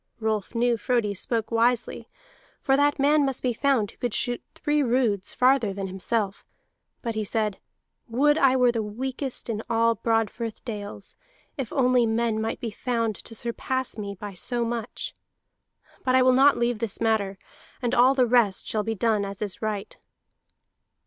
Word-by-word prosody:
Rolf 220 0 -2
knew 240 0 +2
Frodi 220 -1 0
spoke 225 +3 -3
wisely, 235 +1 +1 0.5
for 270 - +2
that 290 +1 +3
man 290 +2 +4
must 270 -2 -2
be 250 -2 +1
found 250 -4 +1
who - - -25
could 245 -3 -2
shoot 245 0 -1
three 295 -1 +1
roods 235 -7 +1
farther 250 -4 +3
than 195 0 -4
himself. 195 +2 -2 0.6
But 230 -2 -2
he 215 0 -2
said: 210 -1 -1 0.5
"Would 280 +6 +3
I 270 -4 +4
were 250 -2 +4
the 230 -1 -1
weakest 255 +5 -4
in 220 -2 -2
all 230 0 +3
Broadfirth 225 0 -2
dales, 205 -3 -6 0.4
if 270 -7 -4
only 250 -3 +3
men 225 -1 0
might 225 - -2
be 235 -4 -4
found 230 -1 -1
to 225 - -9
surpass 255 +3 -2
me 200 -2 -5
by 205 +1 -7
so 240 +6 -1
much. 230 -1 -4 0.9
But 255 0 +2
I 260 - +6
will 255 0 +5
not 275 +2 +5
leave 240 -2 0
this 225 -3 -3
matter, 215 -4 +1 0.4
and 245 -1 -1
all 255 +3 +5
the 255 -2 +4
rest 235 -5 +3
shall 215 - 0
be 225 +1 -2
done 215 0 +1
as 200 -1 -6
is 205 -3 -3
right." 215 -2 -3
230 Hz, 170 wpm, -25 LUFS, 215-255 Hz, 0.9 s, I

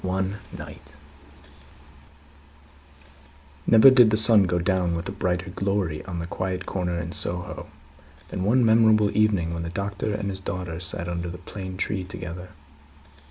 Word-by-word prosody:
One 95 +2 -2
Night 75 - -11 2.7
Never 115 +4 +8
did 125 -4 +6
the 110 - +2
sun 110 -2 +6
go 90 0 0
down 90 -1 0
with 85 +2 -4
a - - -4
brighter 90 -1 -2
glory 95 -5 -2
on 90 -3 -6
the 85 - -4
quiet 90 +1 -4
corner 90 -2 -2
in 85 0 -5
Soho, 90 0 -3 0.6
than 95 - -4
one 120 +5 +3
memorable 110 -2 +4
evening 100 -6 +2
when 85 - -4
the 85 - -4
Doctor 100 +3 -3
and 100 -1 -3
his 95 - -4
daughter 90 -3 -5
sat 85 0 -3
under 85 0 -3
the 90 - -7
plane 95 +1 -8
tree 95 -1 -2
together. 90 -1 -8
95 Hz, 155 wpm, -24 LUFS, 85-100 Hz, 2.7 s, Never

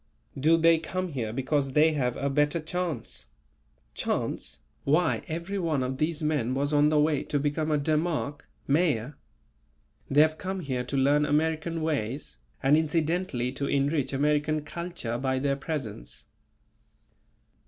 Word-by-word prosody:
"Do 155 +5 +4
they 165 0 +5
come 185 +3 -3
here 120 -8 -3
because 135 +2 -1
they 155 +2 +5
have 125 -5 -1
a 140 - -1
better 150 +3 +2
chance?" 155 - -4 0.7
"Chance? - - -3 0.2
why, 160 +4 +2
everyone 170 -3 -1
of 130 +1 -3
these 155 0 0
men 145 -5 0
was 145 +2 0
on 145 0 +5
the 155 -1 +3
way 150 -1 +2
to 145 - -1
become 150 +2 -1
a 150 - +3
Demarch 150 -1 -1 0.3
(Mayor). 145 -4 +1 0.9
They 145 +2 +5
have 155 0 +2
come 190 0 -3
here 130 -5 -2
to 135 - -3
learn 145 +2 +4
American 160 +2 0
ways, 135 - -3 0.2
and 135 +2 +5
incidentally 160 -4 0
to 140 +1 -3
enrich 140 -1 +1
American 150 +2 +1
culture 170 -9 -4
by 130 0 0
their 140 +1 +1
presence." 135 - -6
150 Hz, 145 wpm, -27 LUFS, 135-160 Hz, 0.9 s, they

